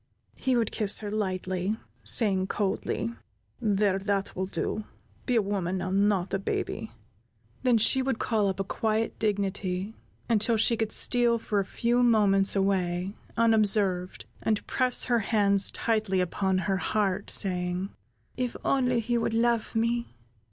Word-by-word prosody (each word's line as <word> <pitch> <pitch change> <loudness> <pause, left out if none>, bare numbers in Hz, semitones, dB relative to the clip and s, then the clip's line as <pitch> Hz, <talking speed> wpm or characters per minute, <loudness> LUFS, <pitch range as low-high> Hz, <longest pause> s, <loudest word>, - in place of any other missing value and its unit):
He 260 -2 0
would 230 -3 0
kiss 210 -2 +3
her 210 -1 -6
lightly, 190 -1 -2 0.3
saying, 190 -5 +2
coldly: 205 +3 -2 0.5
"There, 200 -3 +1
that 200 0 -2
will 185 +1 -2
do; 215 +2 -3 0.4
be 250 - +1
a 225 - +3
woman 190 -2 -2
now, 185 0 -3
not 195 -1 +1
a 195 - +1
baby." 195 - -3 0.7
Then 250 -3 +3
she 225 +5 +3
would 260 -3 -1
call 215 -4 0
up 190 -1 -2
a - - +1
quiet 220 +3 -2
dignity, 200 -2 -2 0.3
until 225 0 +2
she 230 +2 +4
could 220 -1 -2
steal 240 -1 +3
for 215 -2 -1
a 195 - -1
few 240 +5 0
moments 205 -5 +4
away, 190 -1 0 0.2
unobserved, 210 -5 +2 0.2
and 215 -2 -1
press 255 -1 +2
her 240 -2 +2
hands 200 -2 +2
tightly 215 -4 0
upon 190 +1 0
her 195 -2 +1
heart, 200 0 -1
saying: 180 0 0 0.5
"If 250 -2 -2
he 245 -3 0
would 230 - -1
only - - +2
love 235 -2 0
me! 230 - -1
205 Hz, 150 wpm, -27 LUFS, 195-230 Hz, 0.7 s, she